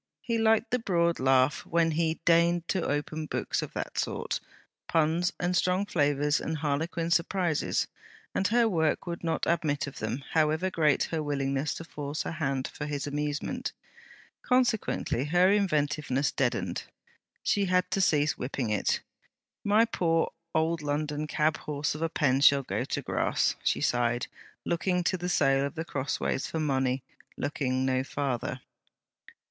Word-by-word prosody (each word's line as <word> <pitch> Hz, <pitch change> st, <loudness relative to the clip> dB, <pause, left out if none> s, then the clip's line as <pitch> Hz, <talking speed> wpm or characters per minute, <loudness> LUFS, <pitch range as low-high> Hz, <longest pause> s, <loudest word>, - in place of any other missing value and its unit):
He 230 Hz, -1 st, 0 dB
liked 225 Hz, +1 st, +3 dB
the 250 Hz, -, +2 dB
broad 170 Hz, -6 st, +1 dB
laugh 130 Hz, +1 st, +3 dB
when 165 Hz, -1 st, +2 dB
he 160 Hz, +1 st, 0 dB
deigned 170 Hz, 0 st, +3 dB
to 190 Hz, -, +1 dB
open 150 Hz, +2 st, -2 dB
books -, -, -1 dB
of -, -, -6 dB
that -, -, -4 dB
sort; -, -, -2 dB, 0.5 s
puns 165 Hz, +2 st, +2 dB
and 180 Hz, +1 st, 0 dB
strong 185 Hz, +2 st, +2 dB
flavours 145 Hz, -4 st, +1 dB
and 160 Hz, 0 st, -2 dB
harlequin 160 Hz, +3 st, -1 dB
surprises; 170 Hz, -1 st, +1 dB, 0.5 s
and 195 Hz, -, +1 dB
her 235 Hz, +1 st, +3 dB
work 160 Hz, -7 st, +1 dB
would 170 Hz, -1 st, -5 dB
not 165 Hz, -1 st, 0 dB
admit 155 Hz, -4 st, +1 dB
of 140 Hz, -, -8 dB
them, 115 Hz, +6 st, -3 dB
however 160 Hz, +4 st, +2 dB
great 155 Hz, -4 st, +3 dB
her 160 Hz, -2 st, 0 dB
willingness 140 Hz, 0 st, -1 dB
to -, -, -6 dB
force 145 Hz, -2 st, -4 dB
her -, -, -4 dB
hand 135 Hz, -5 st, -1 dB
for 150 Hz, -, -6 dB
his 145 Hz, -2 st, -3 dB
amusement: 145 Hz, 0 st, -3 dB, 0.7 s
consequently 240 Hz, -, +1 dB
her 180 Hz, +5 st, +4 dB
inventiveness 150 Hz, -8 st, +1 dB
deadened. 115 Hz, -10 st, -1 dB, 0.6 s
She 200 Hz, -1 st, +2 dB
had 180 Hz, 0 st, +1 dB
to 195 Hz, -, +1 dB
cease 150 Hz, -4 st, +2 dB
whipping 125 Hz, -3 st, -2 dB
it. 105 Hz, -, +1 dB, 0.6 s
'My 210 Hz, +3 st, +4 dB
poor 165 Hz, -7 st, +1 dB, 0.2 s
old 160 Hz, +1 st, +1 dB
London 150 Hz, +1 st, -2 dB
cabhorse 150 Hz, -1 st, 0 dB
of 150 Hz, -, -7 dB
a 165 Hz, -, +1 dB
pen 135 Hz, -4 st, +2 dB
shall 140 Hz, -1 st, +6 dB
go -, -, -2 dB
to -, -, -3 dB
grass!' -, -, +1 dB
she -, -, +1 dB
sighed, 120 Hz, 0 st, +1 dB, 0.4 s
looking 180 Hz, +1 st, 0 dB
to 185 Hz, -, +1 dB
the 180 Hz, 0 st, -3 dB
sale 135 Hz, -5 st, +3 dB
of 140 Hz, -, -3 dB
The 160 Hz, 0 st, -3 dB
Crossways 135 Hz, -2 st, -2 dB
for 160 Hz, -, -3 dB
money; 130 Hz, -3 st, 0 dB, 0.3 s
looking 130 Hz, -3 st, -1 dB
no 130 Hz, 0 st, +1 dB
farther. 135 Hz, -3 st, -3 dB
155 Hz, 155 wpm, -28 LUFS, 140-170 Hz, 0.7 s, shall